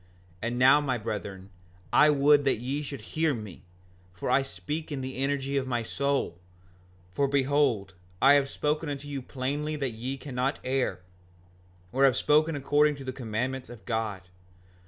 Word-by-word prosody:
5:43 115 - -2
And 120 - -3
now, 130 +4 +6
my 130 -4 0
brethren, 100 -3 -6 0.4
I 150 - +7
would 145 0 +5
that 135 - +3
ye 130 +6 -3
should 140 -1 -6
hear 160 -3 0
me, 105 -7 -9 0.5
for 90 - -2
I 130 +2 +5
speak 150 +3 -5
in 140 -2 -3
the 130 0 -5
energy 140 0 -1
of 135 -1 -1
my 120 -2 -1
soul; 140 -8 -1 0.7
for 140 +9 +1
behold, 135 -7 +1 0.3
I 135 +2 +7
have 140 -1 +3
spoken 150 +2 -1
unto 145 0 -5
you 140 -2 -4
plainly 140 +4 -3
that 135 -4 -2
ye 125 +5 -4
cannot 135 0 -2
err, 130 -8 -1 0.9
or 135 +5 +4
have 130 -2 +4
spoken 155 +1 +3
according 145 +1 +3
to 140 - -9
the 130 -1 -4
commandments 125 +2 -3
of 115 -5 -12
God. 110 -4 -2
135 Hz, 170 wpm, -28 LUFS, 120-145 Hz, 0.9 s, I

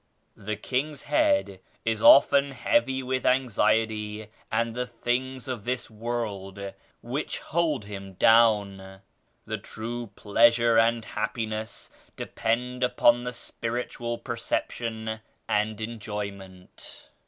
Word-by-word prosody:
The 105 +2 -4
king's 135 +6 -2
head 290 - +2 0.3
is 110 -1 0
often 140 +1 +7
heavy 135 - +1
with 130 0 -1
anxiety 110 -4 +1 0.2
and 115 +1 0
the 125 +1 -3
things 125 +2 -2
of 125 -5 -4
this 125 0 -3
world 100 -4 -4 0.3
which - - -3
hold 155 -8 -1
him 100 -1 -8
down. 100 -3 +3 0.4
The - - -3
true 120 +2 -6
pleasure 115 +2 +4
and 115 0 +2
happi 110 +2 -2
ness 110 0 -6 0.2
depend 125 +3 -2
upon 120 -1 +4
the 125 - -3
spiritual 120 0 -4
perception 115 -1 -3 0.3
and 105 +1 0
enjoyment. 100 -4 -7
115 Hz, 110 wpm, -27 LUFS, 105-125 Hz, 0.4 s, often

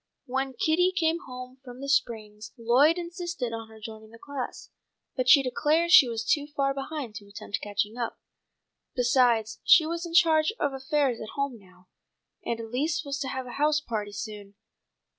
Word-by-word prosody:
When 265 +1 -2
Kitty 340 +8 +2
came 335 -3 +1
home 255 0 -9
from 250 -1 -11
the 275 - -6
springs 220 -6 -1
Lloyd 255 +8 +4
insisted 345 -8 -4
on 225 0 -6
her 220 0 -14
joining 220 0 -9
the 230 - -14
class, 275 +1 -7 0.4
but 255 -2 0
she 280 -3 +8
declared 310 +6 +1
she 265 -8 +8
was 225 -1 -3
too 290 +4 +1
far 275 -2 0
behind 275 -3 -5
to 205 - -12
attempt 200 0 -6
catching 210 +3 -2
up. 235 - -3 0.8
Besides 245 -4 +2
she 325 - +7
was 335 +1 -3
in 335 - -6
charge 325 +1 +4
of 285 -2 0
affairs 270 -2 0
at 215 - -8
home 280 -4 -2
now, 185 -2 -21 0.6
and 230 - -2
Elise 285 +8 -2
was 280 0 -3
to 275 - -3
have 260 0 -4
a 245 - -8
house 300 0 +3
party 215 -7 -4
soon. 205 -1 -8
255 Hz, 180 wpm, -27 LUFS, 225-300 Hz, 0.8 s, she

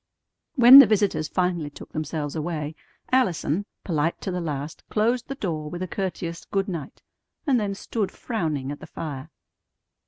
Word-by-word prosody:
When 255 +1 +11
the 275 - +9
visitors 205 -6 +1
finally 175 -3 -1
took 145 - -12
themselves 155 -1 -3
away, 155 -1 -3 0.4
Allison, 200 - +1 0.2
polite 165 -1 0
to 190 - -3
the 180 0 -2
last, 150 -2 -5
closed 235 +3 +1
the 275 - -4
door 160 - -3
with 175 +3 -5
a - - -3
courteous 175 -3 -4
"Good 195 -1 -1
night," 165 -7 -6 0.4
and 265 -5 +3
then 200 -2 -2
stood 205 0 -2
frowning 155 - -3
at 145 - -7
the - - -10
fire. 150 -2 -6
175 Hz, 160 wpm, -25 LUFS, 155-205 Hz, 0.4 s, When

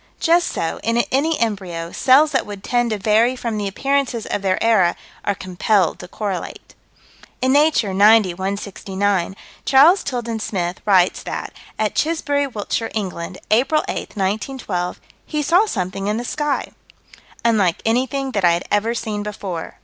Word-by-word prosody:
Just 345 0 +3
so, 165 - -3
in 230 +1 0
any 300 +4 +1
embryo, 185 -7 -2
cells 285 +4 +4
that - - 0
would 200 -2 -8
tend 240 -1 +1
to 215 - -1
vary 220 +5 +3
from 230 -4 -3
the 205 - -2
appearances 270 +1 -1
of - - -2
their 190 -1 +1
era 210 -7 +3 0.3
are 205 - 0
compelled 185 0 0
to 180 - -9
correlate. 195 -1 -5 0.7
In 260 +1 +2
Nature, 290 -9 +3
90 205 -1 +5
169, 195 0 -2 0.3
Charles 310 +8 +5
Tilden 235 -4 -3
Smith 180 -4 -3
writes 185 -3 +4
that, - - -5 0.2
at 215 -1 0
Chisbury, 290 -3 0
Wiltshire, 225 -1 -3
England, 185 -3 -4
April 265 +8 +3
8, - - -5
1912, 195 -2 -2 0.2
he 300 -1 -3
saw 360 +8 +4
something 195 - -3
in 210 +1 0
the 240 - -4
sky 295 +2 -2 0.4
" - - -23
unlike 205 -7 +2
anything 260 +4 0
that 200 -5 -1
I 175 -1 +5
had 170 - -1
ever 225 +3 +1
seen 215 -2 -3
before." 200 -5 -6
215 Hz, 155 wpm, -20 LUFS, 190-260 Hz, 0.7 s, 90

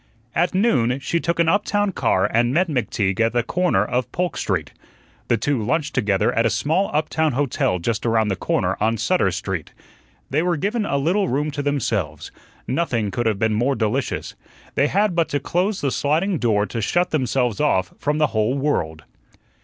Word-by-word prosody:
At 175 +2 +1
noon 135 - +2
she 170 +5 -1
took 170 0 -2
an 170 - +3
uptown 205 +2 +1
car 95 - +1
and 120 +3 +2
met 175 +7 +2
McTeague 105 - -1
at 115 0 +2
the 120 -1 +1
corner 180 - +1
of 125 +3 -2
Polk 180 0 -2
Street. 90 -7 -2 0.6
The 120 - +2
two 130 +2 0
lunched 145 +7 -1
together 100 -6 +1
at 115 - +2
a 115 - +3
small 165 - 0
uptown 155 0 0
hotel 125 -8 0
just 110 +5 -2
around 115 -2 +2
the 95 - 0
corner 95 0 0
on 110 +2 +2
Sutter 180 - +2
Street. 95 -3 -4 0.6
They 145 +4 +2
were 175 -1 0
given 205 +6 -1
a 140 - 0
little 180 +8 +1
room 150 +4 0
to 145 0 -3
themselves. 110 - -2 0.4
Nothing 120 -8 -1
could 120 +4 -1
have 110 -3 +1
been 110 +1 +1
more 125 +6 +1
delicious. 115 +4 -2 0.4
They 140 - +2
had 200 +3 +1
but 165 -2 +1
to 145 - 0
close 185 +8 -1
the 140 - 0
sliding 165 +7 0
door 105 -4 +2
to 115 +1 -4
shut 175 - +1
themselves 125 -4 0
off 95 -11 +1
from 150 +1 0
the 155 -1 +3
whole 110 +5 +1
world. 80 - -1
135 Hz, 190 wpm, -22 LUFS, 110-165 Hz, 0.6 s, an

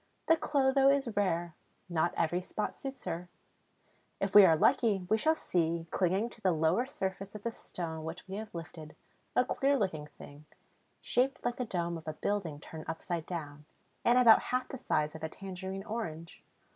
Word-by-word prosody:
The 325 - +5
Clotho 275 -3 +3
is 270 -6 +1
rare; 175 -4 0 0.3
not 170 -1 +1
every 170 +2 +1
spot 210 +3 -3
suits 270 -1 -7
her. 175 +2 -4 0.9
If 195 0 -1
we 205 - +11
are 165 - +6
lucky, 195 +3 +3
we 220 - +5
shall 315 +7 +3
see, 170 - 0
clinging 195 +6 +1
to 220 - -16
the 185 -3 +3
lower 160 +10 +2
surface 195 -4 -4
of 210 - -8
the 235 - -1
stone 160 -7 -6
which 160 +4 -7
we 190 - -7
have 215 -3 -7
lifted, 160 -2 -8 0.4
a 250 - +4
queer 275 +2 +2
looking 160 - -2
thing, 145 0 -13 0.6
shaped 255 +1 +1
like 240 0 0
the 250 - -2
dome 170 -5 -2
of 160 - -17
a 155 - -2
building 175 -8 -2
turned 160 0 -9
upside 165 0 -4
down, 150 -4 -6 0.4
and 240 +1 +4
about 235 -3 +8
half 255 0 0
the 265 - -6
size 155 -10 0
of 160 - -9
a 160 - -3
tangerine 190 +1 -6
orange. 170 -8 -5
190 Hz, 185 wpm, -32 LUFS, 165-235 Hz, 0.9 s, we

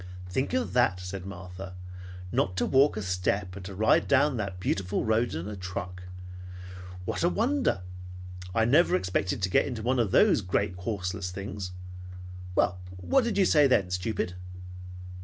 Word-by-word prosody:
"Think 130 +9 -1
of 255 -1 -1
that!" 120 -7 +3
said 90 +1 -6
Martha. 90 0 -8 0.6
"Not 90 0 0
to - - +2
walk 135 -2 +4
a 105 - -3
step, 90 +1 -1
and 100 - -8
to 95 0 -7
ride 110 +3 +3
down 140 0 +3
that 100 -4 -4
beautiful 95 +1 -1
road 110 -2 +1
in 85 +4 -4
a 105 - -5
truck. 90 0 -6 1.0
What - - -2
a 175 - +4
wonder! 240 - 0 0.7
I 110 - +3
never 145 - +4
expected 90 +1 -1
to 95 - +2
get - - +3
into 120 -5 -5
one 125 +2 +1
of 115 -4 +2
those - - +4
great 90 0 0
horseless 90 -1 -3
things. 95 0 -6 0.8
Well, 90 -1 +2 0.2
what 250 - +2
did 230 -3 -1
you 195 - +5
say 150 -5 +5
then, 100 -8 +2
stupid?" 90 0 -2
100 Hz, 165 wpm, -28 LUFS, 90-120 Hz, 1.0 s, you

